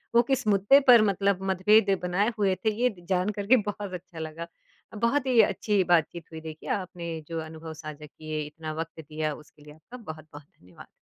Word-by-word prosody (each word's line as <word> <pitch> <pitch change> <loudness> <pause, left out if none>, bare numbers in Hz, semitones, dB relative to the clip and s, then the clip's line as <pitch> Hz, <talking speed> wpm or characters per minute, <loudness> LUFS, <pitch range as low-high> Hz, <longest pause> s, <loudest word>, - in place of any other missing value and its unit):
वो 235 - +8
किस 265 -3 0
मुद्दे 205 +7 +5
पर 240 -3 +9
मतलब 200 -1 +1
मतभेद 195 +1 +4
बनाए 195 +6 +1
हुए 195 -2 +2
थे, 215 +4 -1
ये 250 - +4
द 175 -5 -14
जान 185 +2 +1
कर 200 - -3
के 255 +3 +7
बहुत 205 -2 -6
अच्छा 175 -2 -8
लगा। 160 +1 -6 0.5
बहुत 235 +6 +1
ही 245 -3 +3
अच्छी 205 -1 +1
बातचीत 170 -1 +1
हुई, 160 - -8
देखिए, 160 -1 -9
आपने 170 -3 -5
जो 165 -1 -4
अनुभव 160 0 -9
साझा 155 -1 -9
किए, 155 +1 -6
इतना 155 +1 -7
वक़्त 165 +1 -6
दिया, 155 0 -3
उसके 150 0 -15
लिए 150 0 -13
आपका 160 +11 -13
बहुत-बहुत 155 - -10 0.2
धन्यवाद। 90 -1 -15
175 Hz, 195 wpm, -27 LUFS, 155-205 Hz, 0.5 s, पर